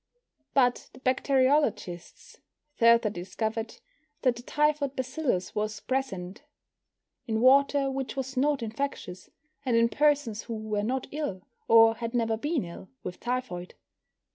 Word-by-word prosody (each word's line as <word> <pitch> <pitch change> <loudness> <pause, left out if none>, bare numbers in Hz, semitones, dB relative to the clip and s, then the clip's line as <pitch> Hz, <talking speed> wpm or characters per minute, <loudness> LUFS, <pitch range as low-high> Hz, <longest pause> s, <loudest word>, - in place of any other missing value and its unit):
But 250 -3 +2
the 255 - -14
bacteriologists 255 - 0 0.4
further 230 -2 +5
discovered 220 +5 -4 0.5
that 255 -3 +3
the 240 - -9
typhoid 295 0 0
bacillus 260 - -2
was 210 0 -2
present 210 -7 -3 0.9
in 220 -1 0
water 275 +2 +4
which 270 -1 -4
was 265 0 -4
not 275 0 +1
infectious, 225 -6 -5 0.3
and 245 -4 +2
in 230 0 +4
persons 285 -6 +1
who 230 - -6
were 215 -1 -2
not 255 +5 -1
ill, 285 -12 -4 0.2
or 225 0 +7
had 230 +1 -4
never 225 -2 +1
been 290 +4 -1
ill, 170 +2 -10
with 180 - -6
typhoid. 240 -8 -4
240 Hz, 130 wpm, -28 LUFS, 215-270 Hz, 0.9 s, or